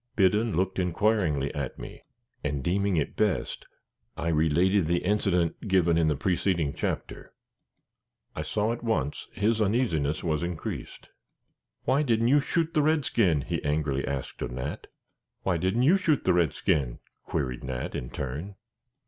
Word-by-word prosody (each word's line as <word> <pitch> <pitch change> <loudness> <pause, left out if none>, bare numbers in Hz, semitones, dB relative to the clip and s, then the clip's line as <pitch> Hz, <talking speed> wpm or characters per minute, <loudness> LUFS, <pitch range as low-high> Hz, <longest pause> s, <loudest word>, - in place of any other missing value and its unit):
Biddon 105 +1 +3
looked 95 +1 0
inquiringly 90 -6 +1
at 70 -3 -4
me, - - -9 0.4
and, 70 -2 -2
deeming 95 +3 +1
it 75 - -1
best, - - -1 0.5
I 85 - -1
related 80 +4 +3
the 85 +2 0
incident 95 -2 +1
given 90 -4 +3
in 80 -1 +3
the 75 - +2
preceding 85 -1 0
chapter. - - -4 1.0
I - - -2
saw 110 +2 0
at 120 - -7
once 110 - -1
his 110 +3 +1
uneasiness 95 - +1
was 80 -4 0
increased. 85 -2 -5 0.7
"Why 140 - +2
didn't 115 -4 +2
you 145 +2 +6
shoot 165 +3 0
the 155 - +3
redskin?" 120 - +2
he - - -3
angrily 75 -2 0
asked 70 -1 -4
of - - -2
Nat. 65 +4 -5 0.6
"Why 90 -3 +1
didn't 95 +8 +1
you 170 +9 +6
shoot 155 -7 +1
the - - +3
redskin?" 75 -6 +1 0.3
queried 65 -1 -3
Nat, 65 -1 -4
in - - -4
turn. 75 +10 -5
90 Hz, 150 wpm, -27 LUFS, 75-105 Hz, 1.0 s, you